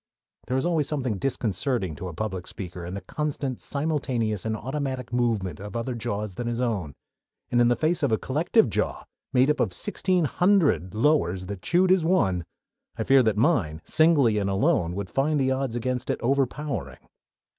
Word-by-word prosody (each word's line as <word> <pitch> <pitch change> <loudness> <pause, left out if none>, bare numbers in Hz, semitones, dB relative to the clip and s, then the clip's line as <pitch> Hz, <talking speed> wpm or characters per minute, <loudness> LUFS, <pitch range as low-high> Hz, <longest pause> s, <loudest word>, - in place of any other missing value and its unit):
There 130 - 0
is 130 - 0
always 160 -5 +1
something 125 -9 -2
disconcerting 120 - -1
to 95 - -5
a 90 - -6
public 95 -2 -4
speaker 90 -2 -7
in 90 - -5
the 100 - -5
constant, 145 -4 -3
simultaneous, 130 - -1
and 110 0 -1
automatic 130 0 -4
movement 110 -9 0
of 105 +1 -8
other 115 +2 -2
jaws 105 -3 -3
than 120 +6 -4
his 120 0 -2
own, 100 - -2 0.6
and 120 - +4
in 120 - +5
the 120 - +3
face 160 +7 0
of 140 - +1
a 110 - +3
collective 155 - +2
jaw, 105 - -2 0.3
made 130 +2 +4
up 150 - -2
of - - +1
sixteen 180 - 0
hundred 160 - +2
lowers 105 - +2
that 100 -1 -6
chewed 180 - +3
as 185 -3 +4
one, 95 - +2 0.5
I - - -1
feared 135 -2 +5
that 110 -2 +1
mine, 105 - +2
singly 145 -10 +4
and 100 -1 -1
alone, 90 -3 +1
would 100 -2 -5
find 145 +2 +1
the 130 -1 +2
odds 130 -3 -1
against 125 +1 -2
it - - 0
overpowering. 135 - -2
120 Hz, 185 wpm, -26 LUFS, 100-145 Hz, 0.6 s, in